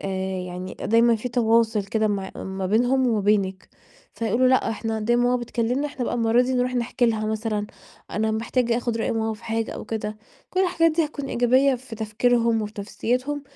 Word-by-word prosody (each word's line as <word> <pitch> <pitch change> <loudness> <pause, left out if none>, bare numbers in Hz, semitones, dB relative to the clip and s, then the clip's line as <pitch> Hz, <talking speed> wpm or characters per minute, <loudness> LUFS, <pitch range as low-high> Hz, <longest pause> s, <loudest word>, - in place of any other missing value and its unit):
آآ - - -5 0.4
يعني 180 +1 -6
دايمًا 230 +1 +4
في 225 +3 -4
تواصل 230 -3 +2
كده 215 +1 0
مع 195 -2 -2
ما 190 0 -4
بينهم 245 +6 +2
وبينك، 200 -3 +1 0.5
فيقولوا 235 +3 +2
لأ 260 -3 +3
إحنا 225 0 -3
دايمًا 240 +3 +2
ماما 250 0 +3
بتكلمنا، 240 +3 -1
إحنا 275 -3 -4
بقى - - -2
المرّة 230 +1 +3
دي 255 +1 -1
نروح 250 0 0
نحكى 245 0 +1
لها 220 -1 0
مثلًا، 215 -1 -2 0.4
أنا 220 +1 0
محتاج 230 +2 0
آخد 235 -1 -1
رأي 225 - 0
ماما 220 -1 -1
في 215 - -16
حاجة 225 0 -2
أو - - -7
كده، 215 -1 -4 0.3
كل 370 - 0
الحاجات 350 -3 +3
ديّة 325 +1 +2
هتكون 295 -2 -6
إيجابية 260 +3 +3
في 240 -2 -9
تفكيرهم 230 +1 +1
وفي 210 0 -5
نفسيتهم، 255 +7 -2
230 Hz, 185 wpm, -24 LUFS, 215-250 Hz, 0.5 s, دايمًا